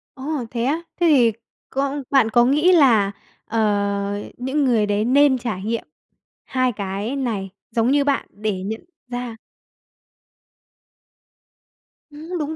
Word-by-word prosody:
Ồ, 275 -1 -3
thế 235 -1 -2
á? 295 +6 0 0.2
Thế 345 - +4
thì 250 -7 +5 0.4
con 275 +1 -2
bạn 265 -5 +4
có 240 +1 +4
nghĩ 300 +8 +4
là, 235 - +5 0.3
ờ, 205 -2 0
những 265 +4 -1
người 230 -5 +3
đấy 205 +1 0
nên 270 +2 +4
trải 230 -6 -4
nghiệm 230 +2 -2 0.6
hai 255 -1 +1
cái 205 +4 -4
này 220 -8 -2 0.2
giống 230 +2 +2
như 285 0 +3
bạn 280 -1 0
để 205 -2 -3
nhận 220 - -5 0.2
ra 245 -2 -5 2.7
Ừm, 315 +4 -7
đúng 305 +1 -3
245 Hz, 135 wpm, -21 LUFS, 210-280 Hz, 2.7 s, thì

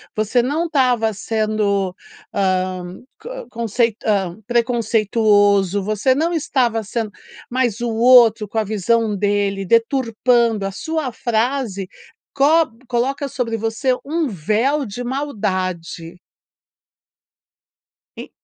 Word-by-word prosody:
você 215 +3 +1
não 295 +7 -1
estava 250 -8 +2
sendo, 210 -3 -1 0.4
hã, 185 -2 -1 0.2
ca - - -8
conceit 230 -1 0
hã, 195 -5 0
preconceituoso, 215 -4 +2
você 215 +5 +1
não 330 +5 0
estava 250 -8 0
sendo 220 +1 -3 0.4
mas 245 -3 0
o 240 - -1
outro, 230 -2 +5
com 215 - -7
a 220 - +3
visão 215 +2 0
dele, 200 -1 0
deturpando 230 -1 +2
a 195 - -2
sua 315 +6 -3
frase 230 -4 -1 0.5
cob 285 -3 +3
coloca 265 +4 -1
sobre 235 -3 -2
você 225 +4 0
um 320 +2 -1
véu 225 - 0
de 235 +3 -6
maldade. 185 - -3 2.0
E - - -8
225 Hz, 105 wpm, -19 LUFS, 205-255 Hz, 2.0 s, outro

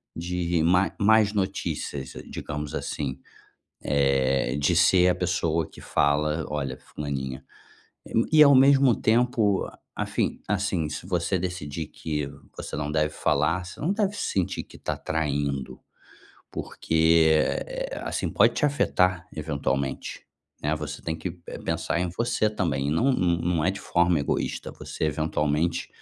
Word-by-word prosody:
de 85 0 -1
má 90 +3 +3
más 105 0 +4
notícias, 85 -8 -3 0.2
digamos 75 0 -5
assim. 70 -3 -3 0.7
Eh, 70 -2 +2
de 75 +4 +2
ser 90 +1 +5
a 90 - +2
pessoa 85 -3 0
que - - -14
fala: 75 +2 +1
“Olha, 70 -3 -3
fulaninha”. 65 -3 -5 0.9
E, 155 -1 +8
ao 140 -1 +8
mesmo 135 -1 +6
tempo, 110 -3 +2 0.3
afim - - -2
assim, 95 -5 0
se 80 +3 -6
você 90 0 0
decidir 85 -4 -4
que 75 -2 -3 0.3
você - - -6
não 75 0 -2
deve 75 0 +1
falar, 80 +7 +1
você 95 - -10
não 170 +7 +1
deve 205 -1 0
sentir 95 - -1
que - - -15
está - - -3
traindo. 70 -4 -2 0.7
Porque, 80 0 +2 0.3
eh, - - -5
assim, - - -2
pode - - +4
te - - 0
afetar 90 -11 +2
eventualmente, 70 -3 -2 0.4
né. 75 - 0
Você 75 -2 -6
tem 80 -1 -3
que, 85 +2 -5
eh, - - -6
pensar 85 - -1
em 90 - 0
você 115 -2 +1
também. 75 -10 -1
Não 125 - +3
não 90 -8 +2
não 85 -2 0
é 95 - +3
de 100 - -7
forma 85 -2 +2
egoísta. 70 - -2
Você, - - -4
eventualmente, 75 +2 0
85 Hz, 140 wpm, -26 LUFS, 75-95 Hz, 0.9 s, E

